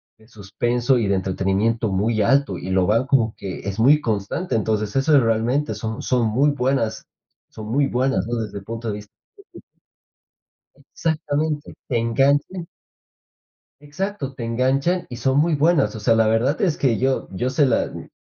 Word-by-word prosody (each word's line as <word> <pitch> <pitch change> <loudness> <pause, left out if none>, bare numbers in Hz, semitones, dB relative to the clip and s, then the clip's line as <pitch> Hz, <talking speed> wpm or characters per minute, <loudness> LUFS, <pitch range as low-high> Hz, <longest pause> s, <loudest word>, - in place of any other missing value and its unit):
de 110 0 -23
suspenso 120 +5 -1
y 105 - 0
de 100 - +2
entretenimiento 95 +4 0
muy 105 +3 0
alto, 135 -4 +2
y 90 - -7
lo 95 -1 +2
van 115 +6 +1
como 115 -6 +2
que 95 -2 -7
es 100 +2 -4
muy 145 +6 +5
constante. 110 - -3
Entonces, 110 -1 -1
eso 140 +3 +3
es 130 - +4
realmente 115 +6 0
son 110 0 -5
son 125 -3 +1
muy 135 +7 +2
buenas 130 -4 -1 0.4
son 110 - -9
muy 135 +5 +1
buenas, 125 -7 0
¿no? 120 - -2
Desde 105 -3 -4
el 100 - -15
punto 115 +2 -5
de - - -2
vista 105 0 -11 0.4
que - - -11 1.3
Exactamente, 155 -2 -2
te 120 - 0
enganchan 140 +9 +1 1.1
Exacto, 145 -1 -5
te 120 - -6
enganchan 135 +9 0
y 120 - -7
son 130 +4 +1
muy 165 +2 +2
buenas, 145 -7 +2
o - - -7
sea, 115 +2 +3
la 115 -1 +3
verdad 120 +7 +1
es 175 -6 +1
que 125 -5 +2
yo 130 +1 0
yo 120 +7 -2
se 140 +2 +3
la 120 - +1
mm, - - -9
120 Hz, 180 wpm, -22 LUFS, 110-140 Hz, 1.3 s, muy